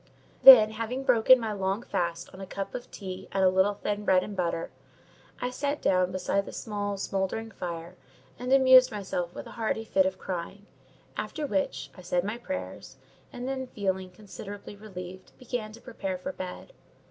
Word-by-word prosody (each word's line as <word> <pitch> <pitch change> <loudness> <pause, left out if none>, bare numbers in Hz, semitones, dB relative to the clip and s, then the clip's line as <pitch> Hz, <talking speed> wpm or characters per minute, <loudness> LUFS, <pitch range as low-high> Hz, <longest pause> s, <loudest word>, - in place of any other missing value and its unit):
Then, 225 -5 +11
having 230 +4 -4
broken 255 0 +6
my 220 -2 -2
long 195 +3 -1
fast 170 -7 -2
on 190 - -10
a 190 - -7
cup 195 +1 -5
of 245 - -6
tea 190 -2 -7
and 195 - +1
a 185 - +6
little 190 +2 +3
thin 205 0 -3
bread 185 -2 +4
and 210 - -7
butter, 170 -2 -2 0.7
I 250 - -2
sat 285 +3 -2
down 185 -1 +2
beside 195 +2 -1
the - - -6
small, 205 -2 -3
smouldering 195 +4 -2
fire, 170 -1 -6 0.4
and 250 +1 -3
amused 260 -1 +7
myself 180 -4 -4
with - - -7
a - - -10
hearty 220 0 -1
fit 190 -3 +3
of 190 0 -4
crying; 190 +3 -6 0.5
after 295 +8 -3
which, 195 -8 -2
I - - -11
said 175 0 0
my 210 +4 -4
prayers, 95 - -6 0.3
and 245 +1 -6
then, 265 -1 -3
feeling 190 -5 -2
considerably 205 +1 -9
relieved, 185 -3 -10
began 245 -3 -4
to 230 - -12
prepare 190 -1 -4
for 230 +10 -5
bed. 185 - -8
200 Hz, 180 wpm, -28 LUFS, 185-230 Hz, 0.7 s, Then